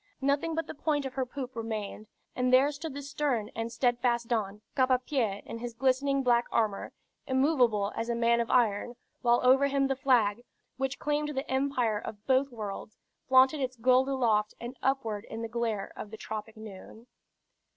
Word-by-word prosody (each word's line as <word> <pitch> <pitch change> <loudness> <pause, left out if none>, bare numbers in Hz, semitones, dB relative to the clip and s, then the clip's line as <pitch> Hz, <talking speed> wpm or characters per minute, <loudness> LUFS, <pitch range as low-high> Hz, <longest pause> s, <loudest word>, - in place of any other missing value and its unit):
Nothing 285 +4 +1
but 325 -1 -1
the - - -7
point 295 -1 -1
of 265 - -5
her 260 -1 -2
poop 260 -1 -6
remained, 215 -2 -5 0.3
and 250 0 +1
there 265 +3 +5
stood 295 0 -7
the 285 - -6
stern 270 -6 -1
and 230 +1 -3
steadfast 240 -1 +1
Don, 210 -3 -1
cap 260 -2 +3
ŕ 255 0 +1
pie 220 -9 -1
in 230 - -7
his 240 -1 -6
glistening 270 +2 +1
black 240 -1 +3
armor, 215 -3 0 0.4
immovable 255 -7 +2
as 230 +1 -3
a 235 - 0
man 235 0 +3
of 230 - -3
iron, 240 -1 +2 0.3
while 240 -1 +4
over 265 +2 +5
him 275 0 +1
the 270 0 0
flag, 240 -5 +2 0.3
which 270 +1 -2
claimed 295 0 -1
the 270 - -2
empire 260 -5 0
of 210 0 -9
both 265 +1 +3
worlds, 215 -3 -7 0.3
flaunted 260 +3 +5
its 255 -1 -2
gold 255 +3 +3
aloft 220 -6 +1
and 240 +2 -7
upward 225 -6 -1
in 225 +1 -5
the - - -2
glare 225 -3 -2
of 210 - -7
the 220 - -9
tropic 220 +1 -6
noon. 220 +1 -11
245 Hz, 185 wpm, -29 LUFS, 225-270 Hz, 0.4 s, there